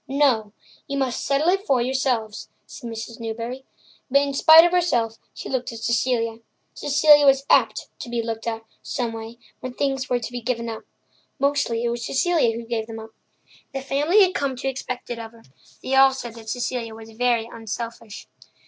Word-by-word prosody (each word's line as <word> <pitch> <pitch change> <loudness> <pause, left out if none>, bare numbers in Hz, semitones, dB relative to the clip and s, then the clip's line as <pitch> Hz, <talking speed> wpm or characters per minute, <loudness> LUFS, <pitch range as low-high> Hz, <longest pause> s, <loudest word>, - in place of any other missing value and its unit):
"No; 265 -7 +2 0.4
you 280 - -3
must 260 -3 -1
settle 280 +3 +1
it 390 +2 +1
for 265 -2 +3
yourselves," 245 -4 -1 0.2
said 240 -5 -9
Mrs. 225 +1 -7
Newbury. 230 +3 -5 0.4
But 280 +2 +4
in 280 -1 -2
spite 320 +4 +8
of 345 - +2
herself 240 -11 +1
she - - -8
looked 260 -2 -2
at 230 - -8
Cecilia. 230 0 0 0.3
Cecilia 290 +1 +5
was 275 -1 +4
apt - - +3
to - - -7
be 235 -1 -1
looked 225 0 -4
at, 225 -1 -3 0.2
someway, 225 -1 -4 0.2
when 255 -1 -7
things 270 -2 -1
were 250 - +2
to 245 0 -6
be 245 -1 -5
given 235 -1 -2
up. 220 -1 -7 0.5
Mostly 280 -4 0
it 240 - +1
was 235 0 -3
Cecilia 310 -6 +2
who 235 - -7
gave 225 -1 -3
them 225 -1 -7
up. 220 0 -9 0.6
The 270 - -2
family 295 +9 +4
had 370 -1 +2
come 275 -2 -1
to 270 +2 -4
expect 255 -2 -4
it 235 - -4
of 225 0 -8
her; 230 - -18 0.4
they 260 - -3
all 270 0 +6
said 240 -3 -6
that 225 -1 -10
Cecilia 240 -1 -3
was 225 0 -11
very 235 0 +1
unselfish. 230 -1 -7
245 Hz, 190 wpm, -23 LUFS, 230-275 Hz, 0.6 s, spite